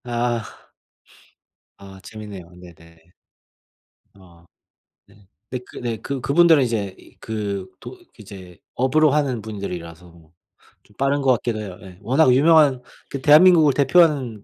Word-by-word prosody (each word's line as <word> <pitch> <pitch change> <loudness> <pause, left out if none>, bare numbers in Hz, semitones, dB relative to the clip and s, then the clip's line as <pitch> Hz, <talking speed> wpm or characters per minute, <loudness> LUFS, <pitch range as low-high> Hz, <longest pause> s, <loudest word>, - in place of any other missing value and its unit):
아. 120 -1 -2 1.3
아 95 -1 -14
재밌네요. 105 -2 -10 0.2
네네. 85 -1 -18 1.0
아 85 -3 -21 0.6
네. 100 - -23 0.4
네 125 - -4
그 125 - -16
네 120 -2 -4
그 140 -2 -5
그분들은 160 +1 +4
이제 105 -6 -3
이 - - -21
그 100 -4 -5
도 - - -11 0.3
이제 95 -3 -13 0.2
업으로 145 +4 +2
하는 135 -5 -1
분들이라서 90 -5 -8
뭐 85 -2 -21 0.5
좀 105 - -26
빠른 140 +1 0
것 135 -1 +2
같기도 115 -2 -3
해요 95 -4 -8
예. 95 -3 -14
워낙 130 +4 +2
유명한 145 -2 +4 0.3
그 140 - -6
대한민국을 155 +1 +6
대표하는 140 - +1
115 Hz, 255 characters per minute, -21 LUFS, 95-140 Hz, 1.3 s, 대한민국을